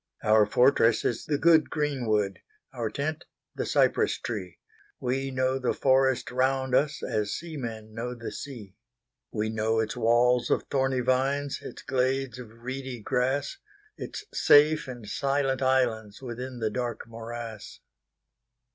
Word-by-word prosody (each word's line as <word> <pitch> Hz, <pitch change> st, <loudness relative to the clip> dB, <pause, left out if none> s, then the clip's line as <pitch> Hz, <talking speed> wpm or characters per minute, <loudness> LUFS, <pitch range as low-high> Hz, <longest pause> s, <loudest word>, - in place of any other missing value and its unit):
Our 105 Hz, -1 st, +5 dB
fortress 125 Hz, 0 st, +4 dB
is 120 Hz, -, -1 dB
the 150 Hz, -, +1 dB
good 160 Hz, +1 st, +5 dB
greenwood, 115 Hz, -, 0 dB, 0.3 s
Our 120 Hz, -4 st, -2 dB
tent 145 Hz, +6 st, -3 dB, 0.3 s
the -, -, -3 dB
cypress -, -, +2 dB
tree; 95 Hz, -7 st, -5 dB, 0.4 s
We 135 Hz, +2 st, -1 dB
know 130 Hz, 0 st, 0 dB
the 125 Hz, -, 0 dB
forest 130 Hz, -1 st, +2 dB
round 130 Hz, +1 st, +1 dB
us, 150 Hz, +3 st, +2 dB
As 105 Hz, -1 st, -1 dB
seamen 115 Hz, -10 st, -6 dB
know 120 Hz, +2 st, -4 dB
the 115 Hz, -1 st, -6 dB
sea. 115 Hz, -9 st, -8 dB, 0.6 s
We 110 Hz, 0 st, -1 dB
know 110 Hz, +1 st, 0 dB
its 110 Hz, -1 st, -1 dB
walls 120 Hz, +2 st, +3 dB
of -, -, +2 dB
thorny 135 Hz, -2 st, +1 dB
vines, 135 Hz, +2 st, 0 dB
Its -, -, -9 dB
glades 130 Hz, -1 st, 0 dB
of 115 Hz, -1 st, -12 dB
reedy 130 Hz, -1 st, -5 dB
grass, 130 Hz, -, -1 dB, 0.4 s
Its 420 Hz, -, -7 dB
safe 150 Hz, +1 st, +5 dB
and 120 Hz, -4 st, -8 dB
silent 135 Hz, +2 st, 0 dB
islandsWithin 125 Hz, 0 st, -1 dB
the 110 Hz, -1 st, 0 dB
dark 120 Hz, -1 st, -3 dB
morass. 115 Hz, -1 st, -8 dB
125 Hz, 135 wpm, -27 LUFS, 115-135 Hz, 0.6 s, Our